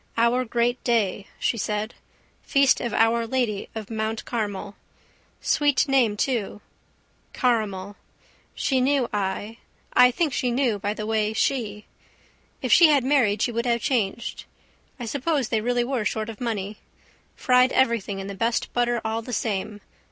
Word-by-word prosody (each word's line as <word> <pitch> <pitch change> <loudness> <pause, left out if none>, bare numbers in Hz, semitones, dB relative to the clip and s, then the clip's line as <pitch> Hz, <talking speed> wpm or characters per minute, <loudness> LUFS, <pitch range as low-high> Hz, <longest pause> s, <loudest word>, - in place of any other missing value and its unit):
Our 235 +2 +2
great 240 +1 0
day, 205 -5 0
she 230 - -1
said. 210 +2 -2 0.5
Feast 275 -1 +3
of 240 - -2
Our 230 +1 +2
Lady 230 -5 -1
of 220 0 -6
Mount 220 0 -3
Carmel. 205 -3 -4 0.7
Sweet 290 -2 +2
name 250 -6 +2
too: 225 -5 -1 0.7
caramel. 205 -6 -1 0.6
She 260 -2 +1
knew 270 -1 +2
I, 205 +2 -3 0.4
I 250 0 +7
think 295 +3 -1
she 250 -1 0
knew 240 -4 +1
by 205 +2 -2
the 215 - -5
way 215 -1 0
she. 215 -3 -1 0.8
If - - +3
she 340 - +8
had 290 -4 +3
married 245 -7 +2
she 240 - 0
would 235 +1 -2
have 235 -1 +1
changed. 235 -4 -2 0.5
I 240 - -4
suppose 280 +1 -1
they 220 - +1
really 245 +1 +1
were 250 -2 -1
short 215 +1 -2
of 220 0 -9
money. 210 -3 -3 0.6
Fried 250 0 +3
everything 230 -6 +1
in 195 - -5
the 200 - -6
best 230 +4 -1
butter 240 -1 +1
all 220 +1 -1
the 250 - -8
same. 210 -1 -2
230 Hz, 155 wpm, -24 LUFS, 210-250 Hz, 0.8 s, she